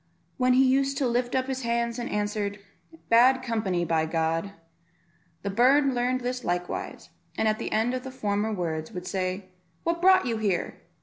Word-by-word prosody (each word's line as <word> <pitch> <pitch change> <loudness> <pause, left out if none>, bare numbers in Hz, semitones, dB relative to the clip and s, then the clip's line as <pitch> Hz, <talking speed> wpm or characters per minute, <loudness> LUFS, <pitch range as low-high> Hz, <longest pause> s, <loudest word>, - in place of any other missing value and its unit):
when 255 0 +3
he 265 +1 +5
used 270 +1 +2
to 275 - +1
lift 245 +1 0
up 260 0 +1
his 265 0 -3
hands 235 0 -1
and 240 - -4
answer, 205 -1 -1 0.6
"Bad 255 +3 +5
company, 205 -8 -1
by 160 -1 +1
G 165 +3 -1 0.5
." 170 0 -39
The 200 - -2
bird 265 +6 +4
learned 250 +1 0
this 250 0 -3
likewise, 175 0 -4 0.3
and 220 - +1
at 215 0 +1
the - - -4
end 225 +3 +1
of 255 - -2
the 265 - -6
former 210 -4 -1
words, 160 -5 -3
would 180 0 -6
say, 185 0 -3 0.3
"What 340 0 -1
brought 375 0 +5
you 230 -2 -1
here? 200 -5 -2
230 Hz, 185 wpm, -26 LUFS, 185-255 Hz, 0.6 s, he